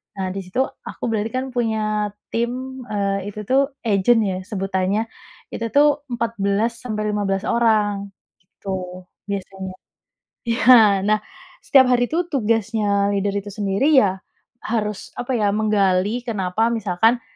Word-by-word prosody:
Nah, 190 Hz, -1 st, -3 dB
di 195 Hz, -, -4 dB
situ 190 Hz, +8 st, -1 dB, 0.2 s
aku -, -, -9 dB
berarti 215 Hz, -1 st, 0 dB
kan 255 Hz, -, -1 dB
punya 215 Hz, -3 st, -1 dB, 0.2 s
tim, 255 Hz, +3 st, -3 dB
eee, 200 Hz, -1 st, -1 dB
itu 210 Hz, +1 st, -6 dB
tuh 270 Hz, +5 st, +1 dB
agent 225 Hz, +1 st, +3 dB
ya 190 Hz, -3 st, -1 dB
sebutannya, 195 Hz, +2 st, -2 dB, 0.4 s
itu 230 Hz, -, -3 dB
tuh 290 Hz, 0 st, +5 dB
14 230 Hz, -2 st, 0 dB
sampai 215 Hz, -3 st, -3 dB
15 195 Hz, -2 st, -1 dB
orang, 210 Hz, -4 st, +1 dB, 0.3 s
gitu 185 Hz, 0 st, -7 dB, 0.2 s
biasanya. 195 Hz, -1 st, -5 dB, 0.8 s
Iya, 230 Hz, 0 st, 0 dB, 0.4 s
nah 215 Hz, +1 st, +3 dB, 0.4 s
setiap 265 Hz, -2 st, +5 dB
hari 245 Hz, 0 st, +3 dB
tuh 345 Hz, +3 st, 0 dB
tugasnya 210 Hz, -4 st, +1 dB
leader 200 Hz, 0 st, 0 dB
itu 200 Hz, 0 st, -6 dB
sendiri 205 Hz, +9 st, +1 dB
ya, 200 Hz, -9 st, +4 dB, 0.5 s
harus 210 Hz, -3 st, -3 dB
apa 245 Hz, 0 st, -2 dB
ya, 205 Hz, -2 st, +1 dB
menggali 210 Hz, +1 st, +1 dB
kenapa 220 Hz, +1 st, 0 dB
misalkan 225 Hz, +2 st, +1 dB
210 Hz, 130 wpm, -21 LUFS, 195-235 Hz, 0.8 s, tuh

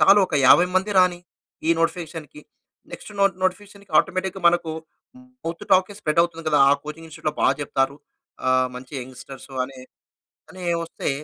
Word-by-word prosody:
చాలు 195 Hz, +1 st, +7 dB
ఒక -, -, -5 dB
50 175 Hz, +6 st, +7 dB
మంది 190 Hz, +3 st, +1 dB
రాని, 180 Hz, -1 st, +4 dB, 0.5 s
ఈ -, -, +4 dB
నోటిఫికేషన్‌కి. 165 Hz, -3 st, -3 dB, 0.5 s
నెక్స్ట్ -, -, -9 dB
నోట్ 195 Hz, -3 st, +3 dB
నోటిఫికేషన్‌కి 200 Hz, 0 st, -3 dB
ఆటోమేటిక్‌గా 185 Hz, +1 st, -1 dB
మనకు 170 Hz, -1 st, 0 dB, 0.7 s
మౌత్ 165 Hz, +1 st, -5 dB
టాక్కే 185 Hz, +2 st, +3 dB
స్ప్రెడ్ 155 Hz, -4 st, +2 dB
అవుతుంది 165 Hz, -1 st, -4 dB
కదా! 150 Hz, -1 st, +3 dB
ఆ -, -, +6 dB
కోచింగ్ 155 Hz, +2 st, -8 dB
ఇన్‌స్టిట్యూట్‌లో 155 Hz, -1 st, -4 dB
బాగా 135 Hz, -, +4 dB
చెప్తారు. 135 Hz, 0 st, -1 dB, 0.5 s
ఆహ్, 130 Hz, 0 st, +3 dB
మంచి 125 Hz, +2 st, -11 dB
యంగ్‌స్టర్సు 130 Hz, +2 st, -11 dB
అని, 130 Hz, 0 st, -11 dB, 0.7 s
అని 185 Hz, 0 st, -10 dB, 0.2 s
ఒస్తే -, -, -4 dB
165 Hz, 150 wpm, -23 LUFS, 145-185 Hz, 0.7 s, చాలు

